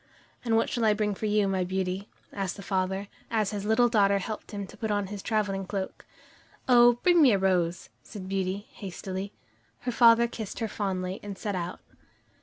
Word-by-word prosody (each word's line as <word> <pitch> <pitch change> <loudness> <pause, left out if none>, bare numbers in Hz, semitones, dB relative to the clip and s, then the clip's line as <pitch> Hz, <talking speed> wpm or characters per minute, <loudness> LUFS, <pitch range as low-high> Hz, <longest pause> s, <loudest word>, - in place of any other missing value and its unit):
"And 230 -2 +1
what 225 - +2
shall 240 - -2
I 215 -1 +4
bring 210 -1 0
for 215 +2 -3
you, 210 -1 +2
my 190 -1 0
Beauty?" 190 +2 -2 0.2
asked 195 -2 -3
the 200 - -8
father, 190 +1 -1 0.2
as 215 -3 0
his 205 -1 -4
little 220 +3 +4
daughter 200 -4 +3
helped 215 +2 -5
him 200 -2 -5
to 195 - -13
put 220 +1 -4
on 205 -1 0
his 200 - -5
traveling 205 -3 -1
cloak. 195 -1 -5 0.6
"Oh, 240 -1 +7
bring 350 -2 +5
me 265 -7 +7
a - - +4
rose," 180 -2 0
said 195 -4 -9
Beauty 195 +1 -2
hastily. 190 0 -6 0.5
Her 245 - -2
father 235 0 +6
kissed 220 -3 -6
her 225 - -1
fondly, 190 -3 -3
and 200 -2 -7
set 205 0 -3
out. 180 -1 -4
200 Hz, 195 wpm, -28 LUFS, 190-220 Hz, 0.6 s, Oh